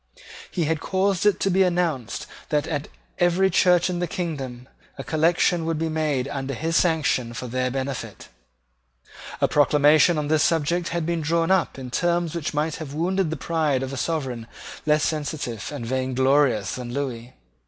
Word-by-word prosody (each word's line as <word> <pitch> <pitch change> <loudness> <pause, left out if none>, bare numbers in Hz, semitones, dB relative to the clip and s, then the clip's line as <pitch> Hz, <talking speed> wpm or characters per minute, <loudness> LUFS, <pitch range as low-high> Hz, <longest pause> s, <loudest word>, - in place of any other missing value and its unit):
He 175 - -1
had 160 0 0
caused 195 +1 +1
it 205 - +3
to 195 - +2
be 190 +2 +3
announced 170 - 0 0.2
that, 150 -1 +1
at 150 -2 -3 0.3
every 180 +2 +3
church 180 0 +4
in 180 -1 -2
the 175 - -1
kingdom, 135 -8 -5 0.3
a - - -5
collection 165 +2 +2
would 165 -1 0
be 160 +1 -1
made 150 -5 0
under 135 -1 -4
his 165 +5 -2
sanction 145 -9 +1
for 125 - -5
their 125 +1 -1
benefit. 135 0 -5 1.1
A - - +4
proclamation 150 +3 +4
on 150 -1 -1
this 155 0 +2
subject 170 +2 +1
had 170 -1 -2
been 170 0 -1
drawn 165 +3 +1
up 190 -7 +1
in 130 -2 -7
terms 175 +1 0
which 170 -3 -3
might 150 +1 -1
have 150 -3 -7
wounded 185 +2 0
the 160 - -3
pride 150 -4 0
of 135 +1 -5
a - - -3
sovereign 130 -4 -3 0.4
less 150 0 +3
sensitive 145 -8 -3
and 140 -5 -5
vainglorious 130 -3 +1
than 125 -1 -6
Lewis. 125 -3 -4
155 Hz, 175 wpm, -24 LUFS, 135-170 Hz, 1.1 s, church